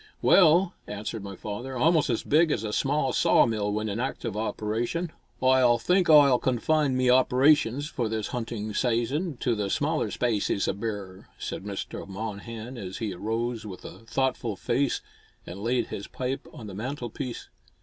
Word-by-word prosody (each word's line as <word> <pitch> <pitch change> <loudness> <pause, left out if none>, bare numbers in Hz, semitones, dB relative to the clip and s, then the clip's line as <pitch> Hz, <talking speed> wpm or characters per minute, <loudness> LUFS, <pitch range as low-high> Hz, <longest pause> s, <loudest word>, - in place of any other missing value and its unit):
"Well," 175 0 +5
answered 105 +1 -5
my 100 -1 -7
father, 120 +7 -6
"almost 155 +3 +3
as 115 - 0
big 160 +3 +4
as 110 - -1
a 105 -1 -3
small 135 0 +1
sawmill 105 -3 +3
when 105 +1 -1
in 105 +2 -3
active 120 -4 -3
operation." 115 +9 -2 0.3
"Oi 130 -2 +5
think 180 +8 +2
Oi'll 140 -5 +7
confine 135 +2 +1
me 130 -1 +3
operations, 130 +1 +4
for 120 -6 -2
this 110 -1 -2
hunting 110 -3 -4
sayson, 130 - 0
to 120 - +2
the 105 -3 -2
smaller 150 -4 0
spacies 105 -4 0
o' - - +1
bear," 100 -3 -6
said - - -5
Mr. 100 -1 -5
Monnehan, 110 +4 -6
as 95 -2 -6
he 110 -4 -3
arose 115 +4 -2
with 95 -3 -9
a 95 - -9
thoughtful 120 -1 -1
face 135 +7 0 0.4
and 90 +3 -8
laid 120 +3 0
his 100 - -6
pipe 130 +1 -4
on 115 - -10
the 100 - -8
mantel 120 +3 -4
piece. 125 -1 -6
120 Hz, 165 wpm, -27 LUFS, 105-135 Hz, 0.4 s, Oi'll